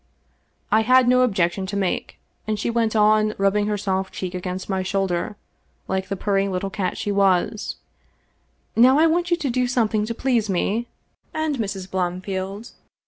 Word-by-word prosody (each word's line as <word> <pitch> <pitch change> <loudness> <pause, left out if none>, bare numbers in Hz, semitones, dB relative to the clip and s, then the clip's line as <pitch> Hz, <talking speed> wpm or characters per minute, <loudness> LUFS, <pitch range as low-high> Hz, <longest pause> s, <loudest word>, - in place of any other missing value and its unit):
I 220 - +5
had 255 +2 +5
no 250 +1 +5
objection 190 -5 +1
to 200 +1 -3
make, 190 -3 -2 0.3
and 215 -1 0
she 235 - -1
went 230 -1 0
on, 215 0 +3
rubbing 200 +1 +2
her 210 -1 0
soft 190 -1 -2
cheek 185 -1 -4
against 180 0 -4
my 190 -1 -1
shoulder 190 0 -1 0.5
like 190 0 -2
the 195 - -2
purring 195 0 0
little 190 +1 -3
cat 185 -3 -2
she 205 - -2
was: 195 +1 +1 0.5
" - - -43
Now 255 +4 +6
I 315 - +5
want 345 +2 +1
you 345 - +2
to 295 -5 -2
do 250 +1 +1
something 220 -3 +1
to 230 - -3
please 235 -4 0
me 210 +5 0 0.2
— - - -29
^and 315 -2 -1
Mrs. 195 -4 -4
Blomfield. 190 +3 -3
205 Hz, 180 wpm, -23 LUFS, 190-230 Hz, 0.5 s, Now